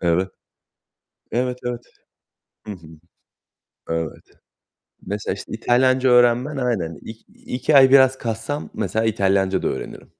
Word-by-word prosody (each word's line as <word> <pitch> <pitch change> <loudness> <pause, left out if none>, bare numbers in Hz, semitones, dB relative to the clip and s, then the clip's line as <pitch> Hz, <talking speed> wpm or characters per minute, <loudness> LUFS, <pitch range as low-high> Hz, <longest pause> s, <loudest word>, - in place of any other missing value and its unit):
Evet. 90 +2 +1 1.0
Evet, 125 +1 -1
evet. 120 -1 -3 0.9
Hı 105 - -5
hı. 90 -5 -12 1.0
Evet. 80 -1 -4 0.8
Mesela, 105 -1 -3
işte, 100 - -10
İtalyanca 130 +3 +2
öğrenmen 125 +4 +3
aynen 100 - -2
ik 110 0 -11
iki 130 +4 -1
ay 130 -1 +7
biraz 130 -1 +5
kassam 115 +6 -4
mesela 110 +2 -1
İtalyanca 95 -3 +1
da - - 0
öğrenirim. - - -7
115 Hz, 120 wpm, -21 LUFS, 95-130 Hz, 1.0 s, ay